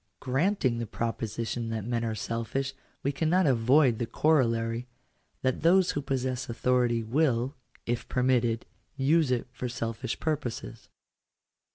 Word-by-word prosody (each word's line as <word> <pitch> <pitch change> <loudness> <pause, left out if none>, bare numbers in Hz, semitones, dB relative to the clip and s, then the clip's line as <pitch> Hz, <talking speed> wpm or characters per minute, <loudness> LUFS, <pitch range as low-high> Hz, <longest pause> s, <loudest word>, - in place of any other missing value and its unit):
Granting 135 - +1
the 115 - -3
proposition 115 +1 -3
that 110 -2 -3
men 120 0 -1
are 110 -1 -1
selfish, 115 +5 -2 0.3
we 140 - +1
cannot 165 +6 +2
avoid 125 -1 +4
the 120 - -1
corollary, 115 -6 +1 0.6
that 130 -1 0
those 180 +3 +5
who 145 - -2
possess 130 -2 -2
authority 120 -1 +1
will, 130 +1 +1 0.3
if 120 0 -2
permitted, 125 -3 +1 0.3
use 145 +2 +3
it 125 -2 0
for 125 -1 -4
selfish 115 -2 -3
purposes. 140 - -3
125 Hz, 130 wpm, -28 LUFS, 115-135 Hz, 0.6 s, those